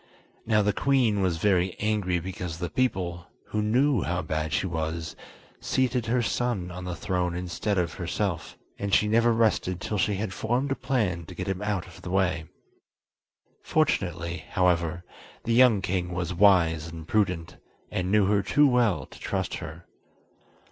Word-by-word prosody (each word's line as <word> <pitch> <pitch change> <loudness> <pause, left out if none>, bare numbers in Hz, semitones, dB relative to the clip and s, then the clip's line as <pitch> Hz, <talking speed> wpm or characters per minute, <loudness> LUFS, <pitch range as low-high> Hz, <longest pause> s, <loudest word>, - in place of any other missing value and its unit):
Now 105 -2 +3
the 105 0 +2
queen 125 -5 +2
was 90 -3 +1
very 90 0 +2
angry 105 -4 0
because 90 -1 -5
the 90 0 -4
people, 90 -9 -1 0.2
who 105 - -1
knew 125 +3 +2
how 90 0 -1
bad 80 0 -2
she - - 0
was, 80 -2 -3 0.4
seated 125 -3 0
her 120 +1 +2
son 115 -7 -1
on 90 +1 -7
the 90 -1 -3
throne 90 0 -1
instead 90 +3 -2
of 85 -3 0
herself, 90 +1 -3 0.2
and 100 -1 +1
she 105 - +3
never 115 +2 +4
rested 110 -5 +1
till 105 +3 -3
she 105 +1 +1
had 100 -1 -3
formed 125 +7 -1
a - - +2
plan 105 - -1
to 90 - -10
get - - -4
him 95 0 -2
out 105 -3 -1
of 90 - -14
the - - -7
way. 90 -4 +1 1.2
Fortunately, 90 - 0
however, 85 -2 +1 0.4
the 115 - 0
young 115 -5 +5
king 90 -2 -1
was 90 0 -2
wise 85 -4 +4
and 80 -1 -9
prudent, 90 -6 0 0.3
and 90 0 -1
knew 105 -1 +4
her 100 +1 +3
too 145 +9 +4
well 120 - +2
to - - -15
trust - - -2
her. - - -9
95 Hz, 170 wpm, -27 LUFS, 85-110 Hz, 1.2 s, young